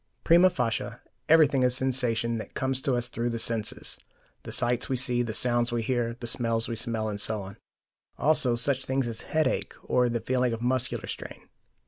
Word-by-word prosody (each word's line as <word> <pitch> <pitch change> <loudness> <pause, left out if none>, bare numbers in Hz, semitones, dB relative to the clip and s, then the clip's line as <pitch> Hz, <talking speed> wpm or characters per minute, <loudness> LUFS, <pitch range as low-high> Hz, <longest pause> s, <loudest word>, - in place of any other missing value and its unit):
Prima 175 +3 +6
facie, 120 -5 -2 0.3
everything 150 -4 +5
is 125 -1 +2
sensation 120 -3 0
that - - -9
comes 130 0 -1
to 130 -1 0
us 120 0 0
through 120 0 -3
the 115 - -3
senses: 115 -2 0 0.4
the - - -9
sights 120 0 0
we 130 - 0
see, 125 -1 +1
the 120 -2 -2
sounds 120 +1 0
we 120 -1 -1
hear, 120 -1 -1
the 120 - -6
smells 115 -1 +1
we 115 - -3
smell, 115 -1 -2
and 100 -1 -2
so 105 -2 +2
on; 95 0 -10 0.6
also 140 -5 +2
such 130 +2 0
things 130 -1 -1
as 115 -1 -5
headache 155 0 -1
or 125 -1 +2
the 120 0 -1
feeling 125 +1 0
of 115 - -5
muscular 130 0 0
strain. - - -8
120 Hz, 190 wpm, -27 LUFS, 115-130 Hz, 0.6 s, Prima